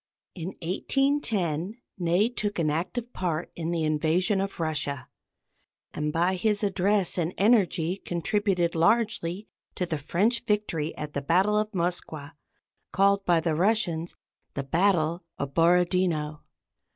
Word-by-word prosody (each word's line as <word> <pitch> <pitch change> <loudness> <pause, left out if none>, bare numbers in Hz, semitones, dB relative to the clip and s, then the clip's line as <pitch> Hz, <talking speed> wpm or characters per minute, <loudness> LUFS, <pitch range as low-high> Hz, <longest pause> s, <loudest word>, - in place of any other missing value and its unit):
In 180 +1 -6
1810, 205 - 0 0.2
Ney 175 +5 +2
took 210 -4 -3
an 155 -3 +1
active 225 +10 -3
part 175 -2 -2
in 165 -1 -3
the 170 -2 -1
invasion 160 +6 +1
of 195 -2 -4
Russia, 150 -4 -2 0.9
and 150 0 -2
by 175 +4 +1
his 210 +2 0
address 195 -1 +1
and 170 +1 -1
energy 195 -5 +2
contributed 175 0 0
largely 200 +1 +1 0.3
to 180 - -1
the 160 -3 -3
French 205 - 0
victory 205 -8 -1
at 150 -1 -6
the 140 - -2
battle 185 +8 +2
of 215 0 -1
the 195 - -5
Moskwa, 165 -4 -2 0.6
called 200 0 +3
by 175 -2 +4
the 165 0 0
Russians 175 -2 0 0.4
the 140 - -2
battle 170 +2 +1
of 140 -1 -4
Borodino. 170 -2 +2
175 Hz, 135 wpm, -27 LUFS, 160-200 Hz, 0.9 s, by